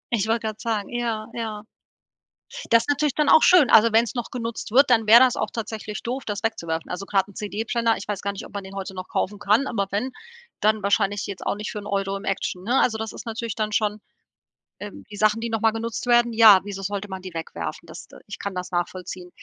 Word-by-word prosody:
Ich 215 Hz, -1 st, -1 dB
wollte 225 Hz, 0 st, +1 dB
grad 215 Hz, 0 st, -6 dB
sagen, 220 Hz, -3 st, -2 dB
ja, 235 Hz, -3 st, -2 dB
ja. 220 Hz, -3 st, -5 dB, 1.1 s
Das 230 Hz, 0 st, +6 dB
ist 265 Hz, -, -10 dB
natürlich 290 Hz, -1 st, +1 dB
dann 300 Hz, -1 st, +2 dB
auch -, -, +7 dB
schön. 350 Hz, -9 st, +6 dB
Also, 225 Hz, +1 st, +7 dB
wenn's 230 Hz, +2 st, +2 dB
noch 240 Hz, -, -3 dB
genutzt 230 Hz, -3 st, -5 dB
wird, 270 Hz, +3 st, +5 dB
dann 225 Hz, -3 st, +3 dB
wär 230 Hz, +2 st, +9 dB
das 255 Hz, -1 st, +4 dB
auch -, -, -2 dB
tatsächlich 220 Hz, -2 st, -5 dB
doof, 255 Hz, +3 st, -3 dB
das 205 Hz, -1 st, -4 dB
wegzuwerfen. 170 Hz, -8 st, -3 dB
Also 195 Hz, +2 st, -5 dB
grad 195 Hz, -1 st, +1 dB
'n 200 Hz, -, -16 dB
CD-Brenner, 225 Hz, +2 st, -1 dB
ich 200 Hz, -, -9 dB
weiß 205 Hz, -2 st, -3 dB
gar 200 Hz, -, -2 dB
nicht, 200 Hz, -, -8 dB
ob -, -, -14 dB
man 200 Hz, -, -5 dB
den 190 Hz, +1 st, -10 dB
heute 190 Hz, -1 st, -5 dB
noch 185 Hz, 0 st, -7 dB
kaufen 205 Hz, +1 st, -2 dB
kann, 210 Hz, +7 st, +2 dB
aber 200 Hz, -4 st, -1 dB
wenn, 220 Hz, +6 st, -2 dB, 0.5 s
dann 215 Hz, 0 st, +2 dB
wahrscheinlich 200 Hz, 0 st, +1 dB
jetzt 195 Hz, -2 st, -7 dB
auch -, -, 0 dB
nicht 210 Hz, 0 st, -5 dB
für 210 Hz, -, -5 dB
'n 205 Hz, -, -10 dB
Euro 195 Hz, 0 st, -1 dB
im -, -, -10 dB
Action, 185 Hz, -1 st, -3 dB
ne? 245 Hz, +6 st, +2 dB
Also 220 Hz, -3 st, +2 dB
das 220 Hz, 0 st, -4 dB
ist -, -, -9 dB
natürlich 230 Hz, -1 st, -4 dB
dann 215 Hz, -1 st, -2 dB
schon 210 Hz, 0 st, 0 dB, 0.8 s
ähm, 205 Hz, -1 st, -9 dB
die 205 Hz, -, -8 dB
Sachen, 215 Hz, +1 st, +2 dB
die 235 Hz, -, -3 dB
noch 225 Hz, -1 st, -2 dB
mal 225 Hz, -, +4 dB
genutzt 225 Hz, +1 st, -4 dB
werden, 240 Hz, -1 st, +4 dB
ja, 220 Hz, -4 st, +8 dB
wieso 195 Hz, -1 st, -6 dB
sollte 200 Hz, +1 st, -4 dB
man 190 Hz, -1 st, -6 dB
die 185 Hz, -1 st, -9 dB
wegwerfen? 85 Hz, -, -6 dB
Das -, -, -10 dB
de -, -, -15 dB
ich -, -, -8 dB
kann 200 Hz, -2 st, -5 dB
das 180 Hz, 0 st, -5 dB
nachvollziehen. 180 Hz, 0 st, -4 dB
215 Hz, 245 wpm, -24 LUFS, 195-230 Hz, 1.1 s, wär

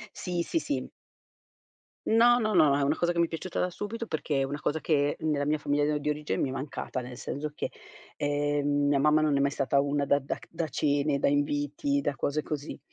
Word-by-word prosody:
Sì, 175 Hz, -2 st, -2 dB
sì, 330 Hz, -, -1 dB
sì. 290 Hz, -, -3 dB, 1.2 s
No, 240 Hz, +2 st, +5 dB
no, 215 Hz, -2 st, 0 dB
no, 150 Hz, -4 st, +6 dB
è 145 Hz, -, +1 dB
una 145 Hz, +3 st, +2 dB
cosa 175 Hz, 0 st, +1 dB
che 170 Hz, -, -2 dB
mi 170 Hz, -, +5 dB
è -, -, -6 dB
piaciuta 170 Hz, +2 st, -4 dB
da 180 Hz, -, +1 dB
subito, 225 Hz, +5 st, -5 dB
perché 150 Hz, -2 st, -1 dB
è -, -, +2 dB
una 145 Hz, +2 st, -3 dB
cosa 160 Hz, +1 st, -1 dB
che 145 Hz, -3 st, +1 dB
nella 150 Hz, -2 st, 0 dB
mia 150 Hz, +1 st, +1 dB
famiglia 145 Hz, +1 st, +1 dB
di 150 Hz, +1 st, -2 dB
origine 150 Hz, 0 st, -2 dB
mi 135 Hz, -, +1 dB
è -, -, -4 dB
mancata, 135 Hz, -1 st, -4 dB
nel 125 Hz, 0 st, -7 dB
senso 145 Hz, +3 st, -4 dB
che, -, -, -3 dB, 0.5 s
ehm, 145 Hz, 0 st, +1 dB
mia 140 Hz, -1 st, +3 dB
mamma 150 Hz, +2 st, +4 dB
non 150 Hz, -2 st, +2 dB
è -, -, +2 dB
mai 140 Hz, 0 st, +2 dB
stata 140 Hz, 0 st, +1 dB
una 140 Hz, 0 st, +1 dB
da 140 Hz, -, +4 dB
da 140 Hz, 0 st, -3 dB
c -, -, -16 dB
da 165 Hz, -1 st, -3 dB
cene, 145 Hz, 0 st, +1 dB
da -, -, +2 dB
inviti, 145 Hz, -, 0 dB
da 140 Hz, -, -1 dB
cose 150 Hz, +3 st, -1 dB
così. 150 Hz, 0 st, -5 dB
145 Hz, 230 wpm, -28 LUFS, 145-160 Hz, 1.2 s, no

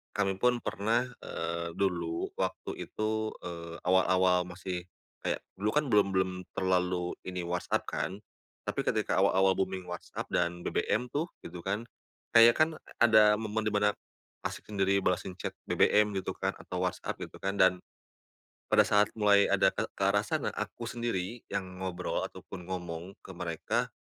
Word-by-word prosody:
kami 95 Hz, -2 st, +1 dB
pun 125 Hz, +1 st, +3 dB
pernah, 110 Hz, +5 st, +1 dB, 0.2 s
eee, 85 Hz, 0 st, -4 dB
dulu 85 Hz, -4 st, -1 dB
waktu -, -, -3 dB
itu, 110 Hz, 0 st, -1 dB
eee, 85 Hz, -1 st, -6 dB
awal-awal 90 Hz, 0 st, +4 dB
masih 90 Hz, 0 st, -5 dB, 0.4 s
kayak -, -, 0 dB, 0.2 s
dulu 105 Hz, +2 st, +1 dB
kan 150 Hz, 0 st, +3 dB
belum 105 Hz, -2 st, +5 dB
belum 95 Hz, 0 st, +2 dB, 0.2 s
terlalu 90 Hz, -1 st, +1 dB
ini 90 Hz, -1 st, -3 dB
WhatsApp 90 Hz, +1 st, -1 dB
kan, 95 Hz, +2 st, -3 dB, 0.5 s
tapi -, -, -2 dB
ketika 95 Hz, -, +1 dB
awal-awal 95 Hz, 0 st, +4 dB
booming 95 Hz, -1 st, -1 dB
WhatsApp 90 Hz, -, -6 dB
dan 85 Hz, 0 st, 0 dB
BBM 125 Hz, -, 0 dB
tuh, 155 Hz, +4 st, 0 dB, 0.2 s
gitu 85 Hz, +1 st, -8 dB
kan 100 Hz, +5 st, -2 dB, 0.5 s
kayak 115 Hz, +1 st, +8 dB
kan 160 Hz, +1 st, +3 dB, 0.3 s
ada 110 Hz, -2 st, +7 dB
momen 110 Hz, 0 st, -2 dB
di 105 Hz, -, +1 dB
mana, 105 Hz, 0 st, +3 dB, 0.5 s
asyik -, -, -5 dB
sendiri 100 Hz, -1 st, +2 dB
balasin 90 Hz, 0 st, 0 dB
chat -, -, -4 dB
BBM 105 Hz, 0 st, +4 dB
gitu -, -, -4 dB
kan -, -, -1 dB
atau 90 Hz, 0 st, -4 dB
WhatsApp 90 Hz, -, -2 dB
gitu -, -, -7 dB
kan, 100 Hz, +1 st, -2 dB
dan, 95 Hz, -2 st, +4 dB, 0.9 s
pada -, -, +7 dB
saat 105 Hz, -1 st, +5 dB
mulai 100 Hz, -1 st, +5 dB
ada -, -, +5 dB
ke -, -, -2 dB
ke -, -, -2 dB
arah -, -, +3 dB
sana, -, -, -1 dB
aku -, -, -4 dB
sendiri 115 Hz, -2 st, -3 dB
yang 90 Hz, -1 st, -4 dB
ngobrol 90 Hz, -1 st, -2 dB
ataupun 90 Hz, -2 st, -10 dB
ngomong 90 Hz, 0 st, -5 dB
ke 95 Hz, -, -9 dB
mereka, 85 Hz, -3 st, -1 dB
95 Hz, 155 wpm, -30 LUFS, 90-105 Hz, 0.9 s, kayak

